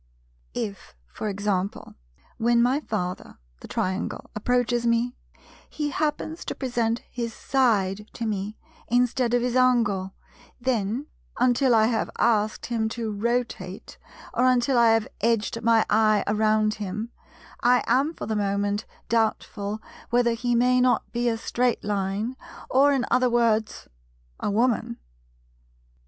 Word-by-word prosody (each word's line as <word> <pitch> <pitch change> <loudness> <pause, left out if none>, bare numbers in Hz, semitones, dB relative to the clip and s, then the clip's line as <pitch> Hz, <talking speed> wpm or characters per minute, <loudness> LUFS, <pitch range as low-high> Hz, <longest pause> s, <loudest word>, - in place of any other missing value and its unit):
If 200 - -5
for 135 - -5
example, 200 -1 -2 0.4
when 235 +1 +3
my 250 +4 +3
Father, 185 -10 -4 0.2
the - - -10
Triangle, 185 +1 -3
approaches 245 +2 +1
me, 235 +2 +1 0.5
he 295 -1 -3
happens 310 +2 -2
to - - -4
present 240 -3 -1
his 235 -2 -4
side 210 -6 +1
to 235 - -4
me 210 0 -3 0.3
instead 245 0 +2
of 240 - +1
his 250 0 -1
angle, 230 -7 +2 0.4
then, 240 0 -1 0.3
until 250 0 +3
I 220 -1 +5
have 225 -1 0
asked 215 -1 +1
him 225 -2 -1
to 225 -1 -3
rotate, 235 +4 -3 0.3
or 250 - +3
until 255 +1 +3
I 235 -1 +6
have 225 -1 0
edged 230 +1 0
my 230 -1 +4
eye 215 -1 +3
around 215 0 +2
him, 210 +4 -4 0.5
I 245 0 +4
am 290 +5 +2
for - - -6
the 220 - -2
moment 205 0 0 0.2
doubtful 215 -2 -1 0.3
whether 240 0 +3
he 245 +1 0
may 250 +1 +4
not 250 0 +2
be 240 0 0
a 225 - -1
Straight 245 +2 0
Line, 205 +4 -2 0.4
or, 280 +2 +5
in 270 -3 +1
other 255 0 +4
words, 230 -2 +1 0.5
a - - -1
Woman. 225 - +1
230 Hz, 135 wpm, -25 LUFS, 210-245 Hz, 0.5 s, I